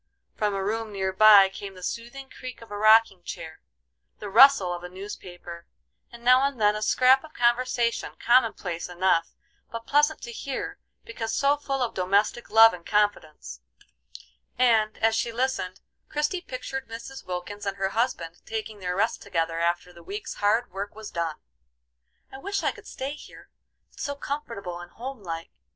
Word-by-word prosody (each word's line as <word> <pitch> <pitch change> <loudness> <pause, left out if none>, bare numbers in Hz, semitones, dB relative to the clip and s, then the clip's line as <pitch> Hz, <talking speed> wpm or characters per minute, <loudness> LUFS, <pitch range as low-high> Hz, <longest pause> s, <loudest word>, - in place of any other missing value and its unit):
From 210 -2 0
a 195 - -2
room 220 +2 -2
near 190 -1 -2
by, 205 -1 +8
came 195 0 -8
the 185 - -12
soothing 240 +7 -5
creak 255 -3 -9
of 225 - -16
a - - -4
rocking 215 -2 +5
chair, 160 -2 -8 0.6
the 205 -2 -7
rustle 225 -6 +7
of 175 0 -7
a 180 - -7
newspaper, 175 -3 -9 0.4
and 235 0 -13
now 255 +1 +6
and 275 -2 -1
then 210 0 +4
a 210 - -4
scrap 255 +4 +4
of 310 -1 -14
conversation 240 0 +1
common 240 -1 +4
place 175 -2 -5
enough, 175 -2 +1 0.3
but 230 0 -7
pleasant 295 +2 +3
to 240 - -6
hear, 400 - -5 0.3
because 225 -1 -4
so 280 +1 +3
full 275 -2 -2
of 235 - -2
domestic 200 +5 +1
love 225 +1 +8
and 175 -1 -9
confidence; 205 - -1 1.0
and, 225 -4 +3
as 225 0 +2
she 235 - -1
listened, 230 -6 -2 0.3
Christie 300 +5 -1
pictured 265 -3 -6
Mrs. 230 +4 -8
Wilkins 185 +3 -6
and 195 0 -2
her 195 0 0
husband 195 -7 -2
taking 220 -1 -5
their 180 -1 -3
rest 220 +4 0
together 165 -4 -2
after 175 +1 -1
the 170 - -14
week's 200 +5 -6
hard 215 +3 +1
work 200 +2 -6
was 220 -1 -9
done. 165 -2 -2 1.0
"I 265 - -9
wish 400 +6 -3
I - - +2
could - - -14
stay 265 +1 -5
here; 300 - -14 0.4
it's - - -11
so 285 - -3
comfortable 235 -12 -5
and 175 0 -10
home 255 +3 -8
like. 165 -3 -6
215 Hz, 175 wpm, -26 LUFS, 185-255 Hz, 1.0 s, by